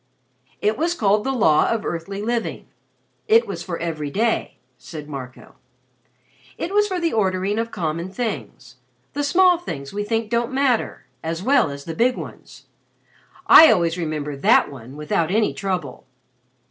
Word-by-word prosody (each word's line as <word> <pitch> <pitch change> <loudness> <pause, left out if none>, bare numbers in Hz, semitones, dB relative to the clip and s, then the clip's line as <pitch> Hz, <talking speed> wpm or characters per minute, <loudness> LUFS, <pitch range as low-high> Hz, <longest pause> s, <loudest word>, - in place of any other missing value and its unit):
"It 215 +4 0
was 340 +2 0
called 210 -5 +2
the 270 - -1
Law 160 - +3
of 230 -1 -1
Earthly 195 +5 -4
Living. 235 +1 -2 0.6
It 455 +2 +5
was - - -6
for 175 -3 -5
every 155 -3 -4
day," 225 +9 -1 0.2
said 150 -3 -9
Marco. 130 -4 -9 1.0
"It 360 - -4
was 415 0 +3
for 375 -3 -2
the 335 -1 -1
ordering 195 0 0
of 230 0 -2
common 170 -3 -3
things 190 - -5 0.4
the 290 - -2
small 355 +4 +4
things 140 - -7
we 205 +1 -2
think 225 +1 -2
don't 235 +1 0
matter, 265 -3 0 0.2
as 165 +2 -4
well 260 - +3
as 140 0 -8
the 165 - -5
big 245 +8 +1
ones. - - -10 0.8
I 320 - +9
always 170 -2 +1
remember 155 -4 -3
that 140 - +3
one 130 0 -11
without 150 +2 -1
any 215 +3 +1
trouble. 180 -12 -4
195 Hz, 160 wpm, -22 LUFS, 155-240 Hz, 1.0 s, I